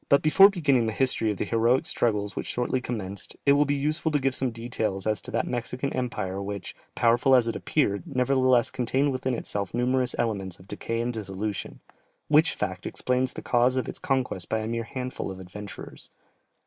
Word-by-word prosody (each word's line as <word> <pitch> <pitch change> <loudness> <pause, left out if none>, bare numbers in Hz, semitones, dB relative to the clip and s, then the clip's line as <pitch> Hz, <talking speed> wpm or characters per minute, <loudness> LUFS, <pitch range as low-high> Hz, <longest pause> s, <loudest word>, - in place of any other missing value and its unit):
Before 195 +6 +8
beginning 140 - +2
the 110 - -1
history 130 -4 +1
of 105 - -2
the - - -1
heroic 115 +3 +2
struggles 105 -3 0
which - - -4
shortly 125 +1 -1
commenced, 100 -5 -5
it 140 - +6
will 145 +1 +4
be 145 0 +1
useful 155 +3 0
to 150 - +3
give 135 -1 0
some 130 0 0
details 115 -4 -3
as 110 -1 +1
to - - -9
that - - 0
Mexican 125 +2 -3
empire 100 -6 -3
which, 100 -1 -5 0.2
powerful 120 +3 +4
as 120 -2 +4
it 115 - -1
appeared, 100 -10 0
nevertheless 130 -3 +3
contained 130 +3 +1
within 130 -1 -1
itself 100 -2 -3
numerous 125 +1 +1
elements 100 -6 -2
of 95 - -17
decay 115 +3 -3
and 120 +1 -2
dissolution, 105 -1 -4 0.5
which 155 +2 +4
fact 95 -3 -3
explains 125 0 0
the - - -7
cause 125 +1 +3
of 130 - -1
its - - -5
conquest 130 -9 -1
by 110 - 0
a 110 - -4
mere 115 0 -2
handful 125 -1 -5
of 95 -1 -7
adventurers. 100 +2 -9
120 Hz, 190 wpm, -26 LUFS, 105-130 Hz, 0.5 s, Before